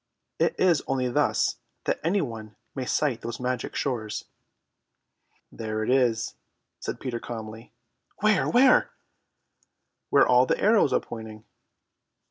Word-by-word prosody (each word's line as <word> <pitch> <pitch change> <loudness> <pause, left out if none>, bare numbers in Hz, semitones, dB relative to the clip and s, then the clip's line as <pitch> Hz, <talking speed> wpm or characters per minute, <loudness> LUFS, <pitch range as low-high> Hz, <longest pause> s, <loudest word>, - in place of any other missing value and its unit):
It - - +1
is 175 -5 +4
only 130 -2 0
thus 120 - +1 0.3
that - - -1
any 185 +5 +2
one 110 -6 -6 0.2
may 130 -2 -4
sight 130 -4 0
those 115 0 -5
magic 125 0 -3
shores. 110 -6 -3 1.3
"There 110 -1 -3
it 115 - 0
is," 120 -4 +2 0.5
said - - -5
Peter 120 -3 -4
calmly. 110 -1 -8 0.5
"Where, 215 -1 +3
where?" 255 - +5 1.2
"Where - - +5
all 125 +1 +5
the - - +1
arrows 215 +1 +4
are - - +3
pointing." 110 -1 -9
125 Hz, 125 wpm, -26 LUFS, 110-145 Hz, 1.3 s, where